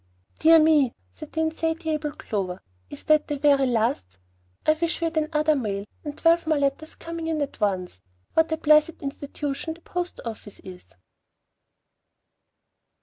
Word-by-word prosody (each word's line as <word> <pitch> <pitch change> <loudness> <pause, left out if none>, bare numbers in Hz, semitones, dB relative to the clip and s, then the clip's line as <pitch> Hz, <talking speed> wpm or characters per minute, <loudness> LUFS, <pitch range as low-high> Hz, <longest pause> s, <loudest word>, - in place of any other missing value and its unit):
"Dear 325 +1 +7
me!" 310 -6 +4 0.2
said 310 -2 -11
the 320 - 0
insatiable 320 -1 -1
Clover, 190 -4 -4 0.3
"is 145 - -10
that 305 -1 +3
the 295 - -2
very 280 -1 +4
last? 215 - -1 0.5
I 310 - +5
wish 335 +2 -2
we 335 - -1
had 330 0 -2
another 310 -1 +2
mail, 205 -6 -2 0.2
and 295 -1 -6
twelve 335 0 +3
more 310 -1 +2
letters 285 +3 -1
coming 335 -1 -6
in 320 -1 -1
at 285 -1 -4
once. 185 - -1 0.3
What 320 0 +3
a 320 - +1
blessed 305 +1 +3
institution 285 +2 -4
the 340 - -19
post 355 +1 -4
office 220 -3 -8
is!" 185 -1 -11
305 Hz, 150 wpm, -25 LUFS, 255-320 Hz, 0.5 s, Dear